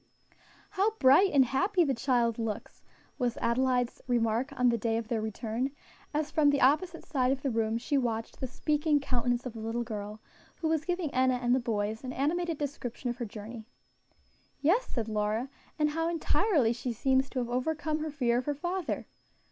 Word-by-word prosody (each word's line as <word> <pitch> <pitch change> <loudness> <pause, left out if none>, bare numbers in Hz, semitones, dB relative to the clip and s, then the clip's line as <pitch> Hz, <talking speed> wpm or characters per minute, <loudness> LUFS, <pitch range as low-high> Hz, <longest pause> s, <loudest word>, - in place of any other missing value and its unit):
"How 405 +3 +1
bright 285 +8 +6
and 270 -2 +5
happy 360 - +2
the 280 -4 +1
child 240 -2 +1
looks!" 225 -2 -4 0.4
was 245 -2 0
Adelaide's 250 +1 +1
remark 240 +2 +1
on 250 0 +5
the 235 - +2
day 225 +1 0
of 230 -1 -4
their 225 -2 0
return, 220 +4 -2 0.4
as, 300 0 -1
from 305 -2 +4
the 285 -1 +2
opposite 320 +6 +2
side 260 -4 +1
of 270 0 -2
the 275 - 0
room, 225 0 0
she 275 +4 0
watched 225 -3 -3
the 260 - -3
speaking 295 +3 +1
countenance 245 -2 -1
of 250 - -5
the 225 - -8
little 225 +2 -2
girl, 210 -2 -6 0.4
who 325 - -2
was 315 -1 0
giving 350 -4 -2
Enna 255 0 +3
and 245 0 +1
the 260 - +4
boys 220 -1 -2
an 255 0 -4
animated 330 +4 0
description 255 -4 -4
of 240 - -7
her 240 - -3
journey. 220 +1 -9 0.9
"Yes," 365 +12 +2
said 230 -3 -3
Lora, 215 +4 -1 0.3
"and 300 -1 +2
how 325 +2 0
entirely 310 - +2
she 245 0 -3
seems 265 +3 +2
to - - -7
have 240 -2 -1
overcome 305 +4 -1
her 310 0 -3
fear 245 -5 +1
of 250 - -5
her 290 - 0
father!" 350 +3 -3
255 Hz, 190 wpm, -30 LUFS, 235-295 Hz, 0.9 s, bright